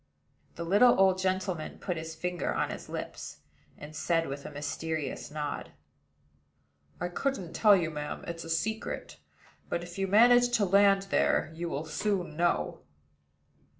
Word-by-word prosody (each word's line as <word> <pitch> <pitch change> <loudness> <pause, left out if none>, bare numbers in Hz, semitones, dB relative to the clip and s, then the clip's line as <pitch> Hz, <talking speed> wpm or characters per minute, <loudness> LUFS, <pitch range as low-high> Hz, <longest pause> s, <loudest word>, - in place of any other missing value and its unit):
The 170 - -4
little 205 +7 +5
old 190 -1 +5
gentleman 185 -3 -2
put 180 - -3
his 160 0 -6
finger 180 +2 -2
on - - 0
his - - -8
lips, - - -6 0.4
and 150 +1 -10
said, 165 0 +1
with 140 +1 -6
a - - -8
mysterious 150 0 -4
nod: 150 -1 -5 1.3
"I 175 - -1
couldn't 185 -1 -3
tell 210 -2 +6
you, 170 -4 0
ma'am. 150 -1 -5
It's 170 0 -5
a 165 - -9
secret; 220 +7 -2 0.5
but, 170 - -2
if 175 +2 -9
you 195 - +1
manage 245 +4 +6
to 205 - +2
land 195 +1 +5
there, - - +2
you 170 +1 -4
will 150 0 -3
soon 180 0 -2
know." 175 +2 0
175 Hz, 150 wpm, -30 LUFS, 160-195 Hz, 1.3 s, tell